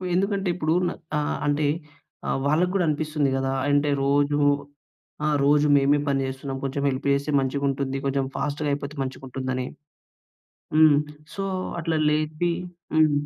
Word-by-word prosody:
ఎందుకంటే 195 +1 0
ఇప్పుడు 160 -2 0
న - - -1 0.3
ఆహ్, 150 0 -1
అంటే 145 +1 +1 0.6
అ - - -1 0.2
వాళ్ళకి 165 +5 +2
కూడా 195 -2 +2
అనిపిస్తుంది 150 -1 0
గదా! 135 0 0 0.2
అంటే 145 +1 +3 0.2
రోజు 145 +1 +2 0.9
ఆ! - - +2 0.2
రోజు 145 +1 +4
మేమే 140 +1 +3
పని 135 -1 +1
చేస్తున్నాం. 135 +1 -5
కొంచెం 140 +1 -2
హెల్ప్ 135 +2 -3
చేస్తే 140 +2 -1
మంచిగా 135 +1 -1
ఉంటుంది. 135 0 -2
కొంచెం 135 0 +1
ఫాస్ట్‌గా 150 0 -1
అయిపోతే 140 +1 -3
మంచిగుంటుందని. 130 -1 -4 1.1
హ్మ్. 155 -2 +7 0.4
సో, 195 - -3 0.4
అట్లా 165 -1 0
లేపి 155 +3 0 0.4
హ్మ్. 155 -1 +5
145 Hz, 140 wpm, -25 LUFS, 135-155 Hz, 1.1 s, హ్మ్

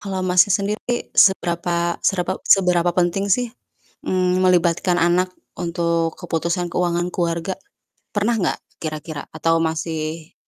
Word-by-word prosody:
Kalau, 195 -2 -4
Masnya, 180 +2 +4
sendiri 210 +5 -2
seberapa, 170 -2 +2
serapa 185 0 +1
seberapa 180 -2 +4
penting 180 +3 0
sih, 245 +3 +1 0.6
mmm, 185 -1 +1
melibatkan 175 0 +2
anak 180 +2 +2 0.3
untuk 170 -1 0
keputusan 170 +1 -2
keuangan 175 0 0
keluarga? 170 +1 -1 0.6
Pernah 210 +3 +1
nggak - - 0 0.2
kira-kira 155 -1 -5
atau 165 +1 +1
masih 160 0 -4
175 Hz, 115 wpm, -21 LUFS, 170-185 Hz, 0.6 s, Masnya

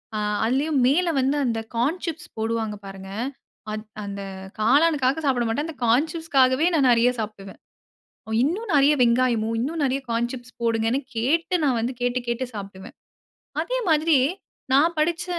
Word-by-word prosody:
ஆ - - -1 0.3
அதுலயும் 275 +5 +1
மேல 345 +6 +2
வந்து 270 +3 +1
அந்த 230 -2 0 0.2
கார்ன் 280 +10 +1
சிப்ஸ் 335 +1 -5
போடுவாங்க, 220 -1 -2
பாருங்க. 195 0 -9 0.6
அது 215 0 -4 0.2
அந்த 200 0 -6 0.4
காளானுக்காக 280 +4 +3
சாப்பிட 250 -4 +2
மாட்டேன். 285 +8 -1
அந்த 320 - -8
கான் 250 +8 +3
சிப்ஸுக்காகவே 290 -3 +2
நான் 275 -5 +4
நிறைய 235 +1 +4
சாப்பிடுவேன். 210 -3 -7 0.8
இன்னும் 390 - -1
நிறைய 285 +1 +5
வெங்காயமோ, 235 -2 +2
இன்னும் 305 +4 -2
நிறைய 270 +1 0
கார்ன் 235 +1 0
சிப்ஸ் 250 -1 -9
போடுங்கன்னு 230 +3 +1 0.2
கேட்டு 320 +10 +1
நான் 255 -5 +2
வந்து 240 +3 -1
கேட்டு, 245 0 0
கேட்டு 235 +2 -1
சாப்டுவேன். 195 0 -8 0.7
அதே - - -2
மாதிரி 315 -1 +4 0.6
நான் 325 +5 +4
படிச்ச 335 +3 0
255 Hz, 150 wpm, -24 LUFS, 230-305 Hz, 0.8 s, நிறைய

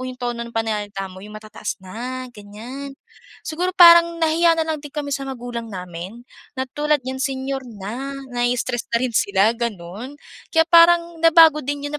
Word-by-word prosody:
'yong 255 - -8
tono 240 -1 -4
ng 235 - -5
pananalita 210 -4 -3
mo, 185 - -12
'yong 210 +2 -10
matataas 215 0 -6
na, 250 +7 -6
ganyan. 240 +7 -9 0.5
Siguro, 355 +4 -2
parang 340 -1 +8
nahiya 330 +1 +3
na 325 - 0
lang 315 -2 -3
din 290 -1 -11
kami 285 -2 -4
sa 275 0 -3
magulang 240 -3 -6
namin 185 +4 -8 0.3
na 260 - -1
tulad 300 0 +1
niyan 260 +1 -5
senior 270 0 -2
na. 235 +6 -6 0.2
Nai-stress 245 0 -1
na - - +3
rin 255 -2 -1
sila, 200 +2 +3
gano'n. 220 +2 -5 0.4
Kaya 325 -1 +4
parang 340 0 +5
nabago 325 -2 +6
din 285 +1 -4
'yon 290 +1 -3
255 Hz, 170 wpm, -21 LUFS, 220-300 Hz, 0.5 s, parang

